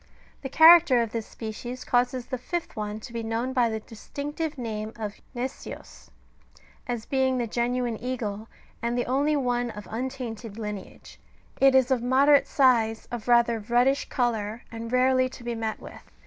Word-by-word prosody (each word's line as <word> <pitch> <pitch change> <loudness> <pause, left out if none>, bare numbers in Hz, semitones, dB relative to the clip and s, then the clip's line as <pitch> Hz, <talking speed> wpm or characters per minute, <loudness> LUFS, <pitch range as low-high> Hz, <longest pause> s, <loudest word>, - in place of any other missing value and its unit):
The 270 - -5
character 320 -4 +7
of 225 - -5
this 225 -1 -4
species 240 +3 -7
causes 245 0 +1
the 255 -1 -4
fifth 340 +6 -4
one 210 0 -4
to 235 +1 -10
be 230 - -3
known 230 +3 -2
by 245 -3 +3
the 220 -1 -3
distinctive 290 +8 -5
name 220 -2 -4
of 215 -2 -6
" - - -32
gnesios,"^* 255 +3 -7 0.8
as 240 -2 -3
being 265 -1 +1
the 240 - 0
genuine 240 0 -1
eagle, 225 -4 -4 0.3
and 235 +1 -1
the 245 - 0
only 285 +4 +1
one 245 -3 0
of 210 -2 -9
untainted 235 -3 -5
lineage; 210 -3 -8 0.4
it 270 -1 +5
is 260 0 +4
of 255 -3 +2
moderate 275 +3 +4
size, 230 -6 +2
of 240 -2 -5
rather 235 -1 +4
reddish 245 +5 +1
colour, 225 -3 -1
and 230 0 -6
rarely 255 0 +3
to 250 - -12
be 240 0 -3
met 225 -1 -3
with. - - -13
240 Hz, 170 wpm, -26 LUFS, 225-260 Hz, 0.8 s, character